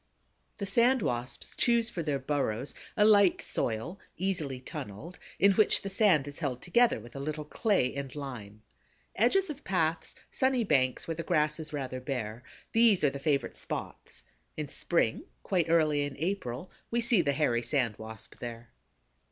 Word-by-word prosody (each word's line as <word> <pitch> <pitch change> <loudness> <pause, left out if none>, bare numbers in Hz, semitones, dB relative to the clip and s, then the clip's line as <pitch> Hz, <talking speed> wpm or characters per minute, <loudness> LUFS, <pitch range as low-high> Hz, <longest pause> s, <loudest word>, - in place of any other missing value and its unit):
The 200 - -3
Sand 235 +4 +3
Wasps 120 +2 -3
choose 235 -1 +2
for 170 - -3
their 150 -3 -1
burrows 135 -3 -2 0.2
a 210 - +5
light 205 -4 +6
soil, 125 - -2 0.2
easily 165 -8 -2
tunneled, 125 - -8 0.2
in 200 - +5
which 210 +2 +3
the 195 - -3
sand 190 -9 +4
is 145 - -6
held 135 -6 -3
together 235 - +3
with 120 +3 -13
a - - -5
little 150 +2 -4
clay 185 - +1
and 140 -1 -6
lime. 110 -7 -7 0.5
Edges 385 -4 +3
of 295 0 -10
paths, 165 -3 -1 0.2
sunny 260 -2 +2
banks 130 - +1
where 165 - -1
the 165 - -4
grass 155 -3 +1
is 155 -2 -7
rather 130 -3 -4
bare—these 135 - 0
are 145 - +4
the 140 - -6
favorite 140 -3 0
spots. - - -6 0.3
In 150 -2 -4
spring, 135 -10 +1 0.2
quite 175 -4 0
early 155 -3 +3
in 145 -1 -4
April, 165 -3 -3 0.2
we 235 - 0
see 235 -4 +4
the 140 -3 +1
Hairy 135 -5 +1
Sand 120 -2 0
Wasp 110 -1 -9
there. 120 -1 -7
150 Hz, 165 wpm, -30 LUFS, 130-195 Hz, 0.5 s, light